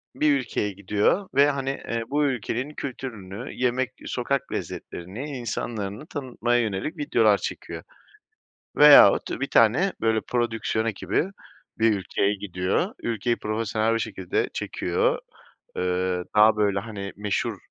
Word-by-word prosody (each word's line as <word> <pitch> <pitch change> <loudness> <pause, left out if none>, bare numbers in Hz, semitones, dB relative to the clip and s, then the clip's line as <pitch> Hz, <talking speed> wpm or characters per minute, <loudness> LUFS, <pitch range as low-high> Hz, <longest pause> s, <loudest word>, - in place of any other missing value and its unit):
bir 145 -2 +3
ülkeye 115 -4 -2
gidiyor 105 - 0
ve 140 +1 +6
hani, 135 -1 -3
eee, 115 -4 -3
bu 145 +1 +2
ülkenin 130 +2 -2
kültürünü, 120 -6 -6
yemek, 125 -1 0
sokak 130 +2 -2
lezzetlerini, 120 - -6
insanlarını 110 0 -4
tanıtmaya 120 -4 -1
yönelik 110 +7 -3
videolar 290 - +3
çekiyor. - - -6 0.9
Veyahut 145 -9 +8
bir 135 - 0
tane, 120 - +4
böyle, 110 -1 +2
prodüksiyon 115 -2 -1
ekibi 105 - -1 0.5
bir 110 -1 +4
ülkeye 100 +1 0
gidiyor, 95 - -1
ülkeyi 115 +1 0
profesyonel 110 +1 0
bir 115 - 0
şekilde 95 -5 -2
çekiyor. - - 0 0.6
Eee, 90 0 -1
daha 110 +1 +6
böyle, 100 -2 +1
hani, 100 -2 -7
meşhur, 105 -1 -1
115 Hz, 120 wpm, -25 LUFS, 100-130 Hz, 0.9 s, Veyahut